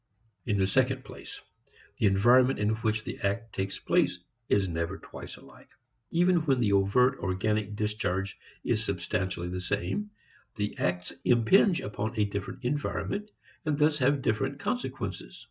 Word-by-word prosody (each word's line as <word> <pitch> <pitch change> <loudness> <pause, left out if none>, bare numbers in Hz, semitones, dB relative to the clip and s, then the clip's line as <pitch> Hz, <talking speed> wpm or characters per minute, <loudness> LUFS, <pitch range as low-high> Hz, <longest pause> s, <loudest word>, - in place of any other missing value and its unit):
In 105 -3 +2
the 95 - +3
second 130 +5 +1
place, - - -10 0.6
the - - +4
environment 120 +7 +5
in 105 0 +1
which 110 -1 0
the - - -6
act 110 +3 -2
takes 95 0 -2
place - - +2 0.3
is 100 -2 +3
never 85 +2 -2
twice - - -9
alike. - - -17 0.4
Even 175 +2 +3
when 145 -6 +2
the 105 -4 +2
overt 125 +7 +3
organic 105 +2 -1
discharge 105 -2 -1 0.3
is 110 - +1
substantially 95 -2 -2
the 90 +1 -4
same, 95 - -2 0.5
the 105 -1 -2
acts 90 0 -1
impinge 145 - +4
upon 110 +3 -4
a 105 - +4
different 100 +5 -5
environment 150 +9 -2 0.3
and 150 -2 0
thus 150 0 +3
have 135 +1 +2
different 135 +6 0
consequences. 250 - -4
110 Hz, 145 wpm, -29 LUFS, 95-130 Hz, 0.6 s, environment